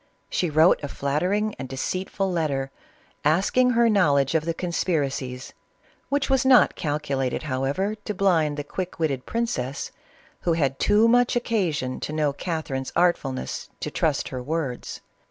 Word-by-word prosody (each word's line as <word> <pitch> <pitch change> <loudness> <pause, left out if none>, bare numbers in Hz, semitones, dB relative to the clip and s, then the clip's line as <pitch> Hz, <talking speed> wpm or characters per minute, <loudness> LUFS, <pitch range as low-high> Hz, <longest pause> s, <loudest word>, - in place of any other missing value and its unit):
She 175 - 0
wrote 155 +1 +4
a - - -2
flattering 180 +11 -1
and 130 - -6
deceitful 185 +8 -2
letter, 140 -6 -1 0.5
asking 195 - +3
her 235 0 +5
knowledge 145 - +3
of 160 -1 +1
the 165 - 0
conspiracies, 140 -8 -2 0.6
which 285 -1 +1
was 265 -1 +2
not 265 -1 +5
calcu 150 -2 -2
lated 130 +2 -1
however 140 +9 -1
to 210 0 -6
blind 165 -7 +2
the 145 - -3
quick 180 +5 -5
witted 140 -6 -1
princess, 140 - -2 0.5
who 170 - +1
had 140 -5 0
too 210 +2 +4
much 245 +1 +3
occasion 175 - -1
to 150 - -4
know 150 -2 +1
Catherine's 145 -5 -4
artfulness, 165 -7 0
to - - -4
trust - - 0
her 130 - -5
words. 140 -2 -4
160 Hz, 150 wpm, -24 LUFS, 140-195 Hz, 0.6 s, her